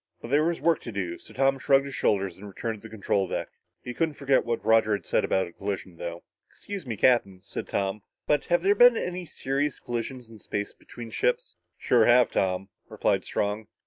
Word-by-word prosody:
But 115 - -9
there 145 +2 +4
was 170 +1 0
work 170 -2 +2
to 115 - -7
do, 90 -4 -4
so - - -13
Tom 135 0 +2
shrugged 135 +1 +4
his 140 - -7
shoulders 100 -7 +1
and 105 +2 -11
returned 110 +2 -5
to 115 - -9
the - - -18
control 100 -2 0
deck. - - -3 0.3
He 125 - -5
couldn't 160 +1 -1
forget 140 -1 +2
what 120 -1 -2
Roger 110 -1 +4
had 100 - -3
said - - +1
about 95 - +1
a 85 - -11
collision, 95 -3 -5
though. 85 0 -6 0.3
"Excuse 200 -8 -8
me, 115 -3 -3
Captain," 100 -6 +3
said - - -6
Tom, 100 +1 -1 0.2
"but 150 -1 +1
have 175 0 +2
there 200 +1 +5
been 245 +1 +7
any 180 -2 -3
serious 140 -2 -2
collisions 120 +1 -5
in 110 -1 -14
space 100 0 -4
between 115 -2 -11
ships?" - - 0 0.2
"Sure 120 -3 +3
have, 120 +1 +5
Tom," 95 +1 0 0.2
replied - - +1
Strong. 105 +1 -2
120 Hz, 210 wpm, -27 LUFS, 100-140 Hz, 0.3 s, been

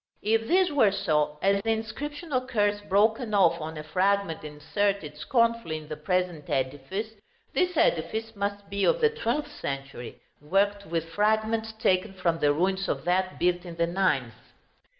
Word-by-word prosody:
If 225 +1 +1
this 365 -1 +3
were 240 -9 +4
so, 150 -5 0
as 195 +1 +3
the 225 - -3
inscription 290 +9 -4
occurs 210 -5 +1
broken 215 +3 +2
off 170 -4 +4
on 160 +1 -5
a 155 - -5
fragment 185 +1 0
inserted 155 +2 -2
scornfully 230 - +1
in 155 -1 -11
the 155 - -4
present 175 -1 -2
edifice, 145 +12 -2 0.4
this 360 -2 +1
edifice 220 - +1
must 200 0 -3
be 200 0 -2
of - - +3
the 455 -2 +4
twelfth 300 - -2
century, 135 -3 -6 0.2
worked 200 +5 +1
with 165 0 -2
fragments 220 +4 +1
taken 205 -3 +1
from 175 -3 0
the 145 -2 +3
ruins 190 +5 0
of - - -2
that 185 +1 +1
built 175 0 +1
in 175 -2 -8
the 170 0 +1
ninth. 155 -9 0
195 Hz, 160 wpm, -27 LUFS, 160-220 Hz, 0.4 s, were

